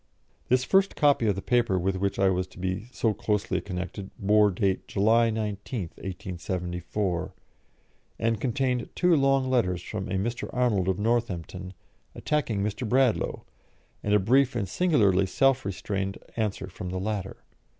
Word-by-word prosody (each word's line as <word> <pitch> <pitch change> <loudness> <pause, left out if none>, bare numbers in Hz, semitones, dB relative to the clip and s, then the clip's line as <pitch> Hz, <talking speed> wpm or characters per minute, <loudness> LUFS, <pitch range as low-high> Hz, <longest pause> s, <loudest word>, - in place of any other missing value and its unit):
This 125 0 +3
first 195 +7 +3
copy 145 -6 +3
of 100 - +2
the 95 - -5
paper 120 -4 +2
with 95 +2 0
which 100 +1 -1
I 95 -1 +4
was 90 0 -1
to - - -18
be 95 +4 -3
so 115 -3 +1
closely 105 0 -1
connected 95 +1 -5
bore 105 +1 +4
date 95 0 -1
July 115 +3 +3
19, 110 +1 -3
1874, 90 0 -4 0.8
and 115 -2 0
contained 125 -1 0
two 180 -2 +4
long 135 -2 +3
letters 90 -9 +1
from 105 -3 -5
a - - -3
Mr. 115 +5 -2
Arnold 115 -7 +1
of 95 -1 +1
Northampton, 95 -5 -2 0.4
attacking 120 -10 -1
Mr. 105 +3 -3
Bradlaugh, 130 -1 +2 0.6
and 105 0 +2
a - - +5
brief 125 +6 +3
and 105 -5 -1
singularly 100 - +3
self 135 +4 +2
restrained 95 0 -3 0.2
answer 105 -4 -2
from 95 0 -7
the 95 +1 -3
latter. 100 -1 -4
105 Hz, 150 wpm, -27 LUFS, 95-120 Hz, 0.8 s, a